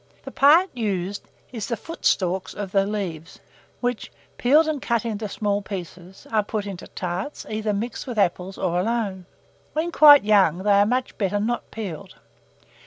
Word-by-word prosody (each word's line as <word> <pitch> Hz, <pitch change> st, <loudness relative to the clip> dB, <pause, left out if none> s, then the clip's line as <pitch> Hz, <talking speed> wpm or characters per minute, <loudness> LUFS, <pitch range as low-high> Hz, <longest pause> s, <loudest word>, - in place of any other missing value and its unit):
The -, -, -8 dB
part 325 Hz, +7 st, +5 dB
used 200 Hz, -4 st, -3 dB, 0.2 s
is 225 Hz, -5 st, -5 dB
the 235 Hz, -, -2 dB
footstalks 190 Hz, -, -1 dB
of 200 Hz, -2 st, -5 dB
the 195 Hz, 0 st, +2 dB
leaves, 180 Hz, -5 st, -5 dB, 0.4 s
which, 245 Hz, -2 st, -2 dB, 0.3 s
peeled 300 Hz, +6 st, +4 dB
and 305 Hz, -3 st, -2 dB
cut 235 Hz, -1 st, 0 dB
into 215 Hz, -2 st, -3 dB
small 205 Hz, -1 st, -1 dB
pieces, 185 Hz, -1 st, -9 dB
are 220 Hz, -1 st, +3 dB
put 210 Hz, 0 st, -4 dB
into 195 Hz, -3 st, -7 dB
tarts, 185 Hz, +10 st, -5 dB
either 215 Hz, 0 st, -1 dB
mixed 215 Hz, +5 st, -4 dB
with 245 Hz, -3 st, -5 dB
apples 185 Hz, -1 st, 0 dB
or 175 Hz, -1 st, 0 dB
alone. 200 Hz, -3 st, -2 dB, 0.5 s
When 320 Hz, +3 st, -1 dB
quite 290 Hz, -5 st, +8 dB
young, 200 Hz, -6 st, +4 dB
they 205 Hz, -, +2 dB
are 200 Hz, 0 st, +5 dB
much 250 Hz, +2 st, -2 dB
better 205 Hz, 0 st, 0 dB
not 235 Hz, +3 st, -2 dB
peeled. 195 Hz, -8 st, -7 dB
205 Hz, 165 wpm, -23 LUFS, 190-235 Hz, 0.5 s, quite